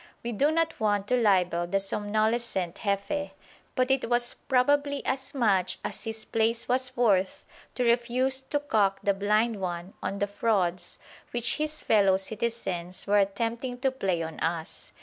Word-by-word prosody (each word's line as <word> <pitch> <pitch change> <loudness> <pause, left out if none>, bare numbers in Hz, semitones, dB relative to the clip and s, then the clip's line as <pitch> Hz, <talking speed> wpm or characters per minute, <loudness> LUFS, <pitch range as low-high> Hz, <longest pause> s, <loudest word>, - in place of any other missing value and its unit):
We 240 - -3
do 275 +7 +2
not 330 +1 0
want 205 -2 +1
to 250 - +3
libel 180 -5 +2
the 195 +3 +1
somnolescent 205 -2 -1
Jefe, 200 +9 -1 0.4
but 255 0 +2
it 265 -3 +1
was 240 0 +2
probably 285 +2 +1
as 265 +1 -2
much 195 -7 +2
as - - -3
his 220 -1 -4
place 230 +1 0
was 255 0 0
worth 195 -6 +2 0.3
to 250 - 0
refuse 245 +3 +2
to 290 +2 -2
"cock 210 -9 +1
the 200 - +3
blind 210 +1 +1
'un" 175 +1 -4
on 200 - -3
the 205 - +1
frauds 190 -4 -1 0.3
which 240 -1 0
his 305 0 -2
fellow 195 -3 +4
citizens 190 -4 -3
were 205 0 +3
attempting 230 +5 -1
to 265 -1 +2
play 190 -10 -1
on 160 -1 -7
us. 165 -1 -3
220 Hz, 160 wpm, -27 LUFS, 195-250 Hz, 0.4 s, fellow